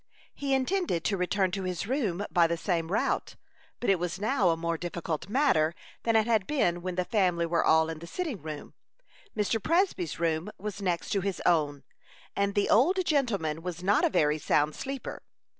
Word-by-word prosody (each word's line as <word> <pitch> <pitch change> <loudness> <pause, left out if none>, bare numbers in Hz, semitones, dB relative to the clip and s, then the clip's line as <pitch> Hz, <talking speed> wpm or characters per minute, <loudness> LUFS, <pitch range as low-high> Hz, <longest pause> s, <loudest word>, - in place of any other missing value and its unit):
He 275 -1 0
intended 265 - 0
to 200 - +1
return 185 +1 0
to 195 +1 -3
his 180 -1 -3
room 205 -6 -1
by 170 -1 +4
the 170 0 -1
same 165 -2 -1
route, 205 - 0 0.4
but 245 - -3
it 195 -3 +3
was 180 +2 -3
now 215 -3 +2
a 165 - +1
more 170 0 -1
difficult 170 0 -4
matter 210 - +2 0.3
than 230 -1 +1
it 220 -1 +4
had 220 -5 +1
been 175 - +1
when 180 0 -4
the 180 0 0
family 180 -6 +1
were 170 0 +1
all 160 0 +4
in 160 -1 -5
the 170 - -9
sitting 300 - -4
room. 155 -1 -7 0.6
Mr. 210 +1 0
Presby's 355 - 0
room 165 +2 0
was 205 0 -6
next 180 -3 -1
to 200 - +1
his 195 0 -2
own, 150 -5 +2 0.5
and 200 0 0
the 205 - +2
old 355 - +4
gentleman 200 - 0
was 175 0 -6
not 200 +2 +3
a - - +4
very 150 -4 +2
sound 150 +1 +2
sleeper. 275 - -6
185 Hz, 190 wpm, -28 LUFS, 170-225 Hz, 0.6 s, by